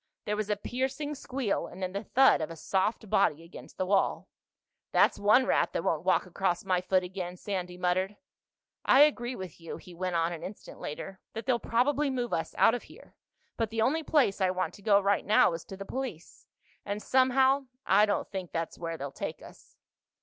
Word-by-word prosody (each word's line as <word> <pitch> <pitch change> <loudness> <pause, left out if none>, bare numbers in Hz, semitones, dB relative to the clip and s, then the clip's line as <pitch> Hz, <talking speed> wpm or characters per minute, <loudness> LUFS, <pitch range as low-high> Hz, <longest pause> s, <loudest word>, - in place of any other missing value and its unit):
There 210 - -1
was 215 0 -3
a 210 - +2
piercing 265 +7 -3
squeal 260 -6 -2
and 190 - -8
then 185 - -2
the 200 +2 -3
thud 265 -2 +4
of 155 - -3
a 165 - -7
soft 195 +7 -1
body 160 -4 +2
against 170 - -13
the 185 - 0
wall. 195 +1 +1 0.6
"That's - - +4
one 215 +6 +5
rat - - +1
that - - -1
won't 160 -1 0
walk 185 0 +2
across 180 0 -1
my 185 -2 +1
foot 185 0 +2
again," 180 -1 -5
Sandy 180 -2 -4
muttered. 185 +3 0 0.7
"I 270 - +6
agree 255 -4 +3
with 185 -5 -8
you," 165 - -7
he 180 - -13
went 180 +1 -3
on 165 +1 +1
an 165 - -7
instant 195 - -9
later, 190 +5 -6
"that 225 - -6
they'll 250 -2 +2
probably 275 +6 +1
move 245 -3 -2
us 165 0 -2
out - - +5
of 245 - -2
here. - - -17 0.4
But 225 -2 0
the 225 0 0
only 310 +7 +2
place 275 -10 +2
I 185 - +3
want 185 0 -2
to - - -14
go 200 -1 +5
right 200 0 +1
now 210 -4 +4
is 165 - -5
to 195 - -9
the 195 - -7
police—and 205 -2 -7
somehow 265 +1 +3 0.2
I 205 +3 +5
don't 205 - -1
think 190 -3 -5
that's 165 -1 -4
where 165 -1 -4
they'll 140 -1 -5
take - - -6
us." - - -16
195 Hz, 205 wpm, -29 LUFS, 180-240 Hz, 0.7 s, I